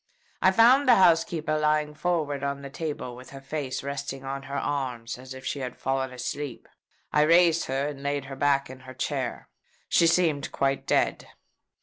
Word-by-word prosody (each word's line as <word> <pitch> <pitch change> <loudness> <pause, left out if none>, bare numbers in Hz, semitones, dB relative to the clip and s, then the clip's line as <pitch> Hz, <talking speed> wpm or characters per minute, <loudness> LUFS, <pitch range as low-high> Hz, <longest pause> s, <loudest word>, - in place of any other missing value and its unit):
I 185 - +6
found 240 +8 +5
the 245 - +8
housekeeper 165 -4 +3
lying 150 0 +1
forward 150 -4 -1
on 140 0 -3
the 140 - -8
table, 145 -6 -5
with 125 +1 -12
her 135 - -9
face 135 -1 -4
resting 140 -1 -5
on 135 0 -4
her 140 - -3
arms, 125 -6 -3
as 130 +1 -9
if 130 0 -11
she 140 - -2
had 125 -2 -5
fallen 135 0 -1
asleep. 130 +1 -5 0.5
I 150 - +4
raised 165 +1 +5
her, 135 +2 -1
and 140 -2 -8
laid 140 -1 -2
her 135 0 -7
back 140 0 +2
in 130 0 -10
her 130 0 -12
chair. 130 - -3 0.4
She 170 - +4
seemed 165 -5 +2
quite 135 0 -1
dead. - - +1
140 Hz, 185 wpm, -26 LUFS, 135-155 Hz, 0.5 s, the